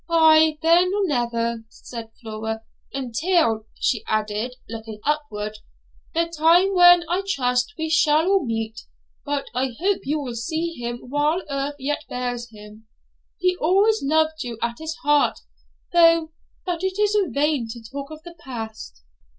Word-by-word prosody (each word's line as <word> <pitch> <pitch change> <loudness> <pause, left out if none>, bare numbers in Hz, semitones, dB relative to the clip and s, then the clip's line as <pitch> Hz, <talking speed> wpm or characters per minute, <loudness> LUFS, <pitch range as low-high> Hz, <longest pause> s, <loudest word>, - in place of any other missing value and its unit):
'Ay, 315 -2 +5
then 345 +3 +5
or 410 -1 +1
never,' 235 -5 -1
said 230 -2 -9
Flora, 220 0 -5 0.3
'until' 265 - 0
she 230 -5 0
added, 215 +3 -1
looking 220 -1 -8
upward 215 -9 -2 0.6
'the 335 +1 +3
time 340 +5 +4
when, 350 -1 +7
I 355 +3 0
trust, 250 -5 0
we 320 0 -2
shall 310 0 +3
all 390 -2 +3
meet. 225 -2 -3 0.4
But 285 -1 -2
I 255 0 -1
hope 390 +3 +1
you 300 +3 0
will 260 -4 -5
see 320 +8 -3
him 240 -3 -5
while 295 +6 +1
earth 280 +1 -2
yet 290 +2 -3
bears 245 -1 -3
him. 215 0 -14 0.5
He 365 0 +1
always 400 +7 +3
loved 315 +2 +1
you 240 -2 -6
at 235 0 -3
his 320 0 -5
heart, 295 0 +3 0.5
though 330 -2 +5 0.3
but 350 -1 -3
it 380 0 -1
is 420 0 +2
vain 280 -1 0
to 235 +1 -7
talk 275 +5 -7
of 310 0 -10
the 345 - -10
past.' 220 - -8
285 Hz, 150 wpm, -23 LUFS, 235-330 Hz, 0.6 s, when